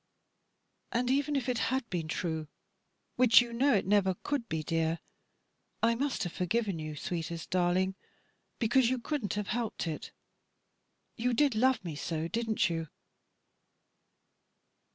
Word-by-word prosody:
"And 245 Hz, +2 st, +1 dB
even 285 Hz, +2 st, +1 dB
if 270 Hz, -2 st, -1 dB
it 245 Hz, -2 st, 0 dB
had 260 Hz, -1 st, -1 dB
been 170 Hz, -3 st, -2 dB
true, 160 Hz, -1 st, -2 dB, 0.7 s
which 240 Hz, -3 st, +8 dB
you 240 Hz, -1 st, -1 dB
know 265 Hz, +2 st, +3 dB
it 195 Hz, -, +1 dB
never 190 Hz, -1 st, +3 dB
could 275 Hz, -5 st, -2 dB
be, 160 Hz, -1 st, -2 dB
dear, 165 Hz, +1 st, 0 dB, 0.9 s
I 230 Hz, +1 st, +5 dB
must 265 Hz, 0 st, -1 dB
have 175 Hz, -, -4 dB
forgiven 195 Hz, 0 st, 0 dB
you, 155 Hz, -1 st, -5 dB
sweetest 165 Hz, +1 st, -4 dB
darling, 185 Hz, +1 st, +2 dB, 0.6 s
because 235 Hz, +1 st, +3 dB
you 260 Hz, -, +1 dB
couldn't 240 Hz, -4 st, -2 dB
have 205 Hz, -1 st, -3 dB
helped 230 Hz, -4 st, -2 dB
it, 160 Hz, -2 st, -5 dB, 1.1 s
you 245 Hz, +1 st, +1 dB
did 285 Hz, 0 st, +3 dB
love 240 Hz, -2 st, +2 dB
me 160 Hz, -3 st, -4 dB
so, 160 Hz, +2 st, -2 dB
didn't 225 Hz, +3 st, +1 dB
you?" 165 Hz, -2 st, -2 dB
215 Hz, 140 wpm, -31 LUFS, 170-245 Hz, 1.1 s, which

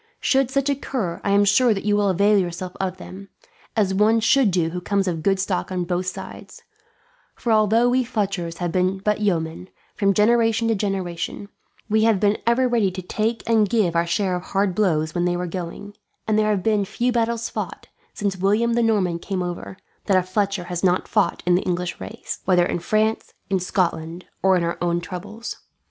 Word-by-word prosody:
Should 270 Hz, -2 st, +2 dB
such 275 Hz, +1 st, 0 dB
occur, 255 Hz, -10 st, -2 dB
I -, -, -1 dB
am 200 Hz, +1 st, +4 dB
sure 235 Hz, +5 st, +4 dB
you 205 Hz, +1 st, 0 dB
will 205 Hz, -1 st, +2 dB
avail 200 Hz, +3 st, +3 dB
yourself 180 Hz, 0 st, -3 dB
of 185 Hz, -1 st, -2 dB
them, 195 Hz, +1 st, -10 dB, 0.5 s
as 195 Hz, -3 st, +2 dB
one 215 Hz, +3 st, +3 dB
should 235 Hz, +1 st, +4 dB
do 175 Hz, -3 st, 0 dB
who 180 Hz, +1 st, -4 dB
comes 200 Hz, +1 st, 0 dB
of 165 Hz, -3 st, -2 dB
good 195 Hz, +2 st, +1 dB
stock 190 Hz, -1 st, -2 dB
on 180 Hz, -1 st, -1 dB
both 180 Hz, +1 st, -2 dB
sides; 185 Hz, -, -8 dB, 0.7 s
for 235 Hz, -, -2 dB
although 220 Hz, +2 st, +4 dB
we 255 Hz, +1 st, +2 dB
Fletchers 195 Hz, -8 st, -2 dB
have 175 Hz, -2 st, -2 dB
been 185 Hz, +2 st, +1 dB
but 210 Hz, +2 st, -1 dB
yeomen, 175 Hz, -2 st, -1 dB, 0.3 s
from 200 Hz, -2 st, +2 dB
generation 225 Hz, +1 st, +3 dB
to -, -, +3 dB
generation, 195 Hz, -1 st, -3 dB, 0.4 s
we 220 Hz, 0 st, +2 dB
have 225 Hz, -4 st, +3 dB
been 205 Hz, +1 st, +2 dB
ever 250 Hz, +2 st, +3 dB
ready 230 Hz, -5 st, +2 dB
to 185 Hz, 0 st, -7 dB
take 220 Hz, +5 st, -2 dB
and 220 Hz, -3 st, +3 dB
give 195 Hz, -7 st, +1 dB
our 170 Hz, 0 st, +2 dB
share 185 Hz, +1 st, 0 dB
of 180 Hz, -, -3 dB
hard 195 Hz, +1 st, 0 dB
blows 160 Hz, -6 st, +1 dB
when 175 Hz, 0 st, 0 dB
they 175 Hz, 0 st, 0 dB
were 180 Hz, -, -2 dB
going; 180 Hz, +3 st, -6 dB, 0.3 s
and 215 Hz, -1 st, +2 dB
there 215 Hz, 0 st, +2 dB
have 200 Hz, -4 st, 0 dB
been 215 Hz, -2 st, +2 dB
few 235 Hz, +5 st, -1 dB
battles 235 Hz, -1 st, 0 dB
fought, -, -, -5 dB, 0.3 s
since 200 Hz, -2 st, -2 dB
William 210 Hz, +5 st, +1 dB
the 235 Hz, -, +2 dB
Norman 195 Hz, -7 st, +1 dB
came 185 Hz, 0 st, -3 dB
over, 175 Hz, +2 st, -6 dB, 0.3 s
that 195 Hz, -2 st, +4 dB
a 185 Hz, -, +2 dB
Fletcher 195 Hz, 0 st, -1 dB
has 175 Hz, 0 st, -5 dB
not 180 Hz, -1 st, +2 dB
fought 210 Hz, -3 st, 0 dB
in 175 Hz, -, +3 dB
the 180 Hz, -, +3 dB
English 180 Hz, -1 st, -3 dB
ranks; -, -, -7 dB
whether 180 Hz, -2 st, +4 dB
in 175 Hz, -, -2 dB
France, 215 Hz, +5 st, 0 dB, 0.2 s
in 190 Hz, -, +2 dB
Scotland, 170 Hz, -2 st, -2 dB, 0.2 s
or 190 Hz, -1 st, +4 dB
in 175 Hz, -, 0 dB
our 170 Hz, 0 st, -2 dB
own 175 Hz, 0 st, +1 dB
troubles. 185 Hz, +6 st, -7 dB
195 Hz, 200 wpm, -22 LUFS, 180-215 Hz, 0.7 s, am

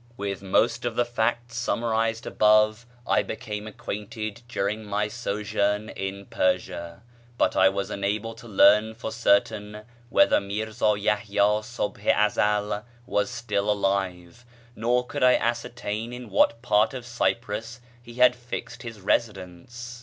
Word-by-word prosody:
With 100 Hz, -1 st, -4 dB
most 100 Hz, +4 st, +1 dB
of 120 Hz, -2 st, -2 dB
the 120 Hz, -, +2 dB
facts 120 Hz, 0 st, -1 dB
summarized 115 Hz, -1 st, 0 dB
above 110 Hz, +2 st, +3 dB, 0.2 s
I -, -, +3 dB
became 105 Hz, -3 st, -6 dB
acquainted 110 Hz, -1 st, -6 dB
during 105 Hz, -2 st, -2 dB
my 105 Hz, 0 st, -1 dB
sojourn 105 Hz, -2 st, -1 dB
in 95 Hz, +1 st, -5 dB
Persia, 85 Hz, 0 st, -2 dB, 0.3 s
but -, -, +2 dB
I 95 Hz, 0 st, +6 dB
was 100 Hz, 0 st, -3 dB
unable 105 Hz, +3 st, -2 dB
to 120 Hz, -, -13 dB
learn 105 Hz, +2 st, +5 dB
for 110 Hz, 0 st, -5 dB
certain 105 Hz, -1 st, +1 dB, 0.3 s
whether 295 Hz, -, +5 dB
Mírzá 105 Hz, +1 st, -1 dB
Yahyá 105 Hz, 0 st, +1 dB
Subh 120 Hz, -4 st, -4 dB
i 100 Hz, -, +3 dB
Ezel 105 Hz, 0 st, +1 dB, 0.2 s
was 105 Hz, -, 0 dB
still 105 Hz, -3 st, -2 dB
alive, 95 Hz, -1 st, -1 dB, 0.3 s
nor 120 Hz, +3 st, +1 dB
could -, -, -5 dB
I 125 Hz, 0 st, +6 dB
ascertain 115 Hz, -1 st, -2 dB
in 125 Hz, -3 st, -8 dB
what 115 Hz, +4 st, +3 dB
part 110 Hz, +1 st, +3 dB
of 125 Hz, -2 st, -6 dB
Cyprus 115 Hz, -1 st, -2 dB, 0.2 s
he 120 Hz, -1 st, -13 dB
had 125 Hz, 0 st, +5 dB
fixed 120 Hz, 0 st, -7 dB
his 115 Hz, -3 st, -8 dB
residence. 110 Hz, +4 st, -3 dB
105 Hz, 140 wpm, -26 LUFS, 100-120 Hz, 0.3 s, I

